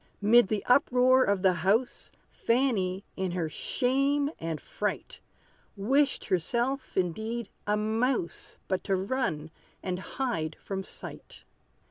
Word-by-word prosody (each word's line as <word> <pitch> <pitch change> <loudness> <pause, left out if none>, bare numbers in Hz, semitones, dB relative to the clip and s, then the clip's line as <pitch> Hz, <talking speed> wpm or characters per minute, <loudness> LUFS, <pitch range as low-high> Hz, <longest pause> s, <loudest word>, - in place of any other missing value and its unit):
'Mid 220 +1 +6
the 210 0 -2
uproar 255 0 +5
of 200 -3 +1
the 190 -1 +5
house, 205 +8 0 0.2
Fanny, 215 -7 0
in 190 -2 -2
her 175 -3 -1
shame 275 - +1
and 160 -1 -3
fright, - - -4 0.6
Wished 270 +7 +2
herself 240 - -1
indeed 220 +6 -1 0.2
a 210 0 +2
mouse, 220 -2 -1
But 190 -1 -1
to 195 - +2
run 190 - -2 0.3
and 180 -1 -2
hide 185 -8 -3
from 195 -1 -4
sight. - - -9
215 Hz, 120 wpm, -29 LUFS, 185-255 Hz, 0.6 s, Mid